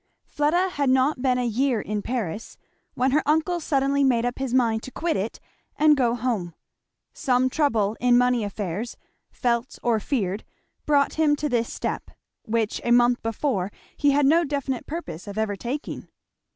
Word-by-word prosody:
Fleda 340 +6 +1
had 285 -6 0
not 260 +1 +2
been 255 -1 +2
a 250 - 0
year 240 +1 +1
in 210 0 -3
Paris 225 -4 -4 0.4
when 255 +1 +2
her 300 +3 +3
uncle 320 +3 +2
suddenly 280 -2 +1
made 245 -3 +3
up 245 +1 -3
his 265 -2 -2
mind 230 -3 +2
to 260 - -9
quit 330 +4 -1
it 200 +4 -3 0.4
and 300 0 +5
go 245 -4 +2
home. 220 -9 -2 0.6
Some 255 0 +1
trouble 225 -9 +1
in 245 0 +4
money 250 -2 +3
affairs, 205 +2 -4 0.3
felt 235 0 -1
or 235 -2 +2
feared, 205 -4 -2 0.4
brought 285 -1 +3
him 295 -2 +4
to 300 +1 -2
this 235 -2 0
step, - - -4 0.4
which 225 -1 -1
a - - -2
month 240 0 +4
before 225 -4 -1 0.2
he 290 - +2
had 285 0 +3
no 325 +5 +5
definite 280 -4 -3
purpose 300 - -6
of 200 +1 -7
ever 220 -2 0
taking. 250 +9 -5
250 Hz, 170 wpm, -24 LUFS, 225-280 Hz, 0.6 s, and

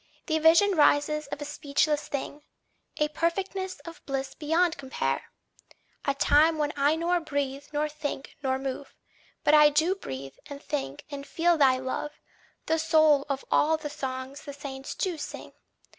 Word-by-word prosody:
The 315 -2 +1
vision 330 +6 +6
rises 300 -2 +3
of 290 +1 -5
a - - -6
speechless 295 +1 0
thing, 285 +1 -5 0.6
A 300 0 +1
perfectness 375 +4 -2
of 335 0 -11
bliss 270 -1 -3
beyond 330 +2 +1
compare! 265 -1 -2 0.8
A 280 - +1
time 310 +3 +4
when 295 -1 0
I 290 +2 +3
nor 345 +2 +1
breathe 285 -3 -3
nor 300 0 0
think 295 -2 -6
nor 265 -1 0
move, 270 +1 -5 0.5
But 295 - +4
I 300 -1 +8
do 315 +5 +2
breathe 135 - -8
and 285 -1 -8
think 275 - -4
and 280 0 -6
feel 340 +4 +2
thy 270 -4 +4
love, 260 +3 -4 0.5
The 320 0 +1
soul 310 -3 +4
of 275 -1 -2
all 315 +1 +4
the 300 -2 -6
songs 260 0 -5
the 285 - -8
saints 275 -1 -7
do 355 -4 -2
sing! - - -7
295 Hz, 160 wpm, -27 LUFS, 275-320 Hz, 0.8 s, I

